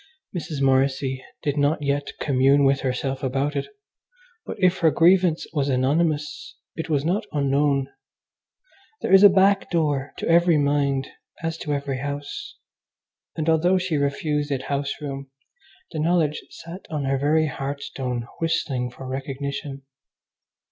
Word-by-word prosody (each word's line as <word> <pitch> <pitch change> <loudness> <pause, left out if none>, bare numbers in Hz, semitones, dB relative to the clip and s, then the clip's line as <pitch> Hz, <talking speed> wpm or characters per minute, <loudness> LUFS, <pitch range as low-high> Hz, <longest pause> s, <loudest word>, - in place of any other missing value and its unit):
Mrs. 155 -4 -3
Morrissy 130 0 +1 0.2
did 145 0 0
not 145 +1 +1
yet 140 0 -1
commune 140 0 +3
with 135 0 +3
herself 135 +1 -2
about 135 +2 -1
it, 140 - -2 0.8
but - - -5
if 185 -1 +3
her 165 - +5
grievance 175 0 +3
was 145 -3 0
anonymous 150 +3 0 0.2
it 160 - -5
was 145 -2 +1
not 205 +6 0
unknown. 140 -1 +1 1.1
There - - 0
is 195 - +9
a 205 - +10
back 195 +1 +3
door 145 -5 0
to - - -4
every 170 -1 +5
mind 140 -2 +1 0.4
as 165 0 -1
to 150 - -2
every 140 -2 -3
house, 145 - -5 0.8
and 155 -1 -3
although 170 +3 +3
she 180 -3 -1
refused 145 +1 -1
it 135 -2 -2
house 140 0 -2
room, 140 -2 -6 0.6
the 160 - -4
knowledge 160 -2 +1
sat 175 +3 -10
on 150 -3 -2
her 135 0 0
very 155 +3 +3
hearthstone 135 -4 -4
whistling 150 -6 -1
for 130 +2 -10
recognition. 135 +1 -5
145 Hz, 140 wpm, -24 LUFS, 135-160 Hz, 1.1 s, a